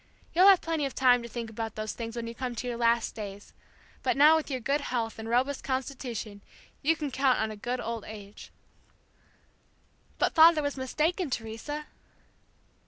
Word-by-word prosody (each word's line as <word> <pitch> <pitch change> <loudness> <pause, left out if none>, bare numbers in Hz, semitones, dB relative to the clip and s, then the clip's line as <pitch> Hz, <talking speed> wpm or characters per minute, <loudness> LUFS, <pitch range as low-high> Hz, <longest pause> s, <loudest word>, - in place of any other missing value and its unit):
You'll 365 +4 +6
have 390 -3 +7
plenty 325 -2 -1
of 270 - -10
time 250 -2 +5
to 235 - -8
think 230 -1 -5
about 225 0 -5
those 215 0 -4
things 230 -1 -6
when 235 -1 -4
you 230 - -6
come 250 0 -4
to 250 - -4
your 240 - -2
last 235 0 +1
days; 205 -2 -8 0.5
but - - 0
now 300 +3 +7
with 320 -1 -1
your 260 -2 -2
good 280 +5 0
health 230 -5 -3
and 220 0 -6
robust 260 +4 +1
constitution 255 -6 -4 0.4
you 325 +3 +3
can 295 -3 -4
count 260 0 +2
on 220 0 -1
a - - -7
good 245 +4 -3
old 230 -2 -4
age.'" 205 -1 -10 1.7
"But - - +1
father 320 -1 +7
was 285 0 -2
mistaken, 310 +6 -1
Teresa!" 245 +6 -5
250 Hz, 180 wpm, -28 LUFS, 225-285 Hz, 1.7 s, have